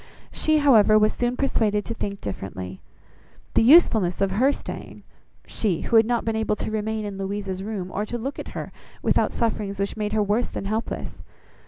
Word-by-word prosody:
She, 310 0 +2
however, 225 -8 +6
was 215 0 +3
soon 245 +1 -1
persuaded 210 -6 +1
to 230 - -4
think 200 -3 -5
differently. 95 -1 -6 0.7
The - - +4
usefulness 225 - +5
of 195 -1 +1
her 250 +8 +3
staying! - - -7 0.4
She 195 -7 -1
who - - -1
had 225 -1 +6
not 240 -1 0
been 225 -1 0
able 220 -1 0
to 215 - -4
remain 220 0 -2
in 200 -1 -6
Louisa's 195 -1 -3
room, 195 -3 -5
or 205 - -2
to 240 - -3
look 265 +5 -5
at - - -6
her, - - -5 0.3
without - - +2
sufferings 210 -4 -2
which 200 0 -2
made 210 -1 -3
her 215 -1 +2
worse 210 +4 0
than - - -5
helpless! 215 +3 -3
215 Hz, 190 wpm, -24 LUFS, 200-230 Hz, 0.7 s, however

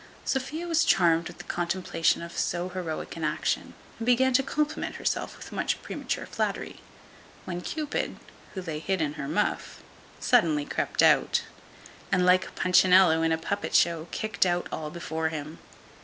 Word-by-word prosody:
Sophia 295 +6 -2
was 330 -2 +3
charmed 170 -3 +3
with - - -10
the 175 - -9
contemplation 175 -1 0
of 170 - -9
so 175 +1 -1
heroic 175 -4 -5
an 165 - -6
action, 150 0 -1 0.2
and 225 - -3
began 260 +1 +4
to 260 - +5
compliment 300 +3 -2
herself - - -2
with - - -11
much - - -1
premature - - -4
flattery, - - -3 0.7
when 175 -1 -4
Cupid, 305 - -3 0.4
who 190 - -4
lay 160 -3 -4
hid 190 +3 -1
in 150 -2 -1
her 150 -2 -5
muff, - - -2 0.4
suddenly 150 -3 +3
crept - - 0
out, - - +4 0.7
and 180 0 +3
like 185 0 +3
Punchinello 180 -2 +5
in 165 0 +2
a 160 - +2
puppet 200 +5 -3
show, 165 -1 +3
kicked 215 -2 0
all 175 -1 +1
out 155 -1 -4
before 160 -2 -2
him. 155 0 -6
175 Hz, 160 wpm, -27 LUFS, 160-195 Hz, 0.7 s, to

